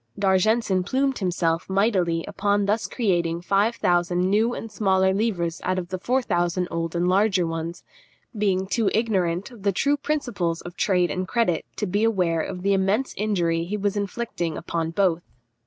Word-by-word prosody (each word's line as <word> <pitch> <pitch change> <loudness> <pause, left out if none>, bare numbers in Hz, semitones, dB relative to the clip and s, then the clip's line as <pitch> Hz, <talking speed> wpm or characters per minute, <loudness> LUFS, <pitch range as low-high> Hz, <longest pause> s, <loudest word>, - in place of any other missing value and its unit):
D'Argenson 195 +1 +2
plumed 265 +6 0
himself 175 -3 0
mightily 190 -4 +1
upon 205 0 0
thus 210 +3 0
creating 175 -7 0
five 200 +5 +2
thousand 175 0 +1
new 225 +4 +2
and 225 - -7
smaller 190 -2 +2
livres 190 -6 -1
out 185 +1 0
of 175 -1 -4
the 185 -1 -4
four 255 +6 0
thousand 175 -2 0
old 165 0 -3
and 175 +1 +1
larger 190 -1 +3
ones, 165 +1 -4 0.5
being 195 -3 +1
too 205 +2 +1
ignorant 195 -3 0
of 235 -4 -13
the 200 0 +2
true 285 +10 +1
principles 245 - -2
of 175 0 -9
trade 180 -3 +1
and 185 0 -3
credit 225 -9 0
to 210 - -2
be 205 +3 0
aware 180 -7 +2
of 180 +2 -5
the 200 0 +3
immense 195 +7 +1
injury 175 -6 0
he 200 +5 -3
was 205 0 -1
inflicting 200 -5 -3
upon 165 -1 -2
both. 175 -1 +1
190 Hz, 170 wpm, -24 LUFS, 175-210 Hz, 0.5 s, larger